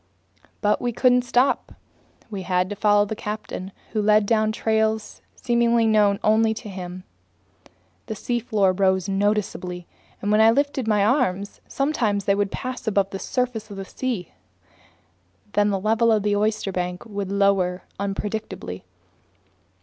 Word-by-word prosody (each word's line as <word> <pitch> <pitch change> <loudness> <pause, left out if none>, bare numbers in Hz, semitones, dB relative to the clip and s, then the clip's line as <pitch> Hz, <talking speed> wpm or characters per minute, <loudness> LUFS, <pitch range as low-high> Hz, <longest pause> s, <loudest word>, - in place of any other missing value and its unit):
But 210 0 +2
we 245 - 0
couldn't 250 +1 +3
stop. 250 +2 +1 0.6
We 200 -2 -4
had 180 +1 0
to - - -3
follow 205 0 +3
the 220 - -4
captain, 210 -3 -6 0.2
who 215 - 0
headed 210 0 +4
down 215 0 +2
trails 220 0 -1
seemingly 235 -1 +2
known 210 -2 +3
only 220 +1 +3
to 220 -1 -8
himself. 185 -1 -7 1.0
The 220 - -4
seafloor 215 -4 0
rose 190 -1 +1
noticeably, 195 -3 -1 0.3
and 205 - -1
when 210 +1 +5
I 220 - +7
lifted 275 0 +1
my 210 -2 +3
arms, 205 -6 0
sometimes 235 -8 0
they 200 - +3
would 200 0 0
pass 255 -2 -5
above 200 -2 +1
the 195 - -5
surface 240 -3 -2
of 200 - -8
the 195 - -5
sea. 230 -6 -4 1.2
Then 205 0 +3
the 195 -1 0
level 225 +3 +2
of 215 -2 +2
the 205 0 +1
oysterbank 195 -4 -1
would 200 -3 -5
lower 195 -2 +2 0.2
unpredictably. 200 - -4
210 Hz, 145 wpm, -23 LUFS, 195-225 Hz, 1.2 s, I